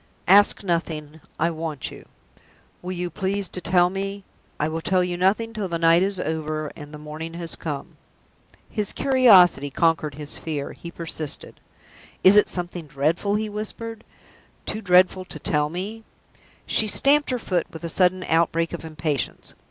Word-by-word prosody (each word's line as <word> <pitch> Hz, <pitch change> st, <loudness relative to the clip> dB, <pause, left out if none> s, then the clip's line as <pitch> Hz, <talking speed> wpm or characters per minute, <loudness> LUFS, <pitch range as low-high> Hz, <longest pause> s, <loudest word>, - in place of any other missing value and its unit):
"Ask 205 Hz, +3 st, +5 dB
nothing. 160 Hz, -4 st, -3 dB, 0.2 s
I 165 Hz, +2 st, +1 dB
want 160 Hz, -3 st, -5 dB
you." -, -, -13 dB, 0.7 s
"Will 180 Hz, -, -5 dB
you 175 Hz, -1 st, -3 dB
please 195 Hz, +3 st, -1 dB
to 180 Hz, -, -5 dB
tell 175 Hz, 0 st, +3 dB
me 195 Hz, +1 st, -4 dB, 0.2 s
?" -, -, -36 dB
"I 150 Hz, -, +1 dB
will 160 Hz, +1 st, -3 dB
tell 185 Hz, +2 st, +2 dB
you 180 Hz, -1 st, -2 dB
nothing 205 Hz, +6 st, +1 dB
till 210 Hz, -4 st, -3 dB
the 170 Hz, -2 st, -2 dB
night 165 Hz, +1 st, +5 dB
is 195 Hz, 0 st, 0 dB
over 155 Hz, -2 st, -3 dB
and 145 Hz, 0 st, -10 dB
the 150 Hz, -, -8 dB
morning 155 Hz, +2 st, -7 dB
has 170 Hz, -1 st, -2 dB
come." 145 Hz, -4 st, -6 dB, 0.7 s
His 210 Hz, -3 st, -3 dB
curiosity 200 Hz, -, +5 dB
conquered 155 Hz, -1 st, +1 dB
his 150 Hz, 0 st, -5 dB
fear. 150 Hz, -3 st, -4 dB
He 170 Hz, -, -9 dB
persisted. 165 Hz, -3 st, -5 dB, 0.6 s
"Is 190 Hz, +2 st, +8 dB
it 210 Hz, -, +6 dB
something 175 Hz, -2 st, -3 dB
dreadful?" 155 Hz, +9 st, 0 dB
he 215 Hz, +1 st, -1 dB
whispered. 215 Hz, +2 st, -6 dB, 0.6 s
"Too 215 Hz, -, -4 dB
dreadful 185 Hz, -1 st, +4 dB
to -, -, -9 dB
tell 150 Hz, -1 st, 0 dB
me?" 200 Hz, +7 st, -5 dB, 0.6 s
She 220 Hz, -, +2 dB
stamped 285 Hz, +7 st, +3 dB
her 255 Hz, -, 0 dB
foot 180 Hz, -7 st, -1 dB
with 160 Hz, -, -10 dB
a -, -, -2 dB
sudden 185 Hz, +2 st, +2 dB
outbreak 165 Hz, 0 st, +1 dB
of 170 Hz, -, -5 dB
impatience. 155 Hz, -3 st, -3 dB
175 Hz, 165 wpm, -23 LUFS, 160-195 Hz, 0.7 s, Is